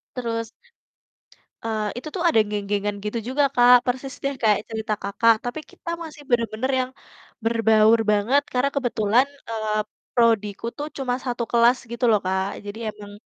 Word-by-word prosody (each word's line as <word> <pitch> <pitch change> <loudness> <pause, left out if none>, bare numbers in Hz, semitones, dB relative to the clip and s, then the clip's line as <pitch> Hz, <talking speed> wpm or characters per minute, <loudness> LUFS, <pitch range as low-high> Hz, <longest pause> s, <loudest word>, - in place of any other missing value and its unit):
Terus, 230 -2 -2 1.2
eee, 220 -1 -1
itu 305 - -7
tuh 360 - -2
ada 225 -9 +4
geng-gengan 205 0 -2
gitu 210 +3 -2
juga 285 +3 +2
Kak, 245 0 +7
persis 260 +2 -2
deh 275 0 0
kayak 215 -2 +4
cerita 220 -1 -3
Kakak, 225 +3 +4
tapi 245 +5 -3
kita - - -12
masih 305 -2 -10
bener-bener 235 +2 0
yang 255 - -2 0.5
berbaur 225 -1 +4
banget, 215 +7 +3
karena 255 +2 +1
kebetulan, 245 -1 +2 0.2
eee, 215 -1 -2 0.4
prodiku 225 -3 +2
tuh 295 - -3
cuma 255 -2 -1
1 240 -2 -2
kelas 235 +1 +5
gitu 235 +1 -3
loh 215 - +5
Kak, 190 +1 0 0.2
jadi 205 +2 -6
emang 205 -1 -12
230 Hz, 155 wpm, -23 LUFS, 215-250 Hz, 1.2 s, Kak